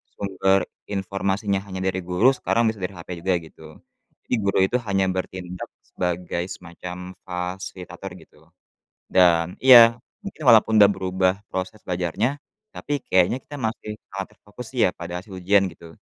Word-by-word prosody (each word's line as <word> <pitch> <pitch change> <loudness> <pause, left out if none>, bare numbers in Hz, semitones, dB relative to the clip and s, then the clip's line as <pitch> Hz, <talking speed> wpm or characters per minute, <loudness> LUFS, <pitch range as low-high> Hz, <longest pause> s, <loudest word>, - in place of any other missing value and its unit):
sumber 95 -1 +1 0.3
informasinya 100 0 -1
hanya 95 -1 -5
dari 95 0 0
guru, 90 +9 +4
sekarang 115 -2 +1
bisa 110 - -13
dari 90 +2 -3
HP 85 - -11
juga, 95 0 +2
gitu. 80 -1 -14 0.6
Jadi - - +1
guru 100 -1 +1
itu, 120 +6 0
hanya 95 -1 +2
bertindak 90 -1 -5 0.2
sebagai 90 -1 -3
semacam 90 +1 -8 0.2
fasilitator, 90 0 -6
gitu. 75 - -21 0.7
Dan 85 -1 +4
iya. 120 -3 +9 0.3
Mungkin 200 -5 -8
walaupun 110 -1 +6
udah 100 - +7
berubah 95 -1 0 0.2
proses 95 +3 -4
belajarnya, 90 - -1 0.4
tapi 145 -1 -3
kayaknya 95 +6 +3
kita 145 - -9
masih 110 -4 -4 0.2
sangat 95 0 -4
terfokus 110 +4 -11
sih - - +1
ya, - - +1
pada 85 +1 -6
hasil 100 - -14
ujian, 100 +2 +3
gitu. 80 -1 -14
95 Hz, 150 wpm, -23 LUFS, 90-105 Hz, 0.7 s, iya